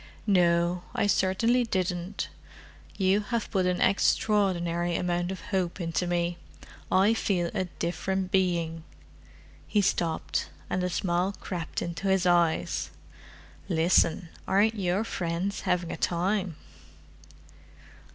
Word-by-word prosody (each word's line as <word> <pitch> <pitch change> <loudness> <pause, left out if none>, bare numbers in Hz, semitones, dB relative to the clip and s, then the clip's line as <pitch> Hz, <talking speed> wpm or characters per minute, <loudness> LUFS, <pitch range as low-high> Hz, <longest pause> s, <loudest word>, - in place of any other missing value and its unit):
"No, 175 -3 +3
I - - +2
certainly 205 +5 +2
didn't. 185 -2 -2 0.7
You 195 +1 +3
have 215 +2 -3
put 190 -3 +1
an 180 0 0
extraordinary 175 -4 +2
amount 175 +1 -1
of 190 - -6
hope 185 -1 0
into 170 +1 -1
me: 175 0 -1 0.5
I 195 +4 +5
feel 180 -6 0
a 185 - 0
different 185 +2 -2
being." 170 -4 0 0.8
He 210 - +1
stopped, 170 -4 -1 0.2
and 180 - 0
a 180 - 0
smile 180 +2 0
crept 175 -4 -4
into 170 +3 -4
his 190 -1 +2
eyes. 175 -2 +2 0.8
"Listen—aren't 175 +4 +2
your 195 -1 0
friends 180 -1 -2
having 180 -2 0
a - - -4
time!" 185 0 0
180 Hz, 110 wpm, -28 LUFS, 175-195 Hz, 0.8 s, I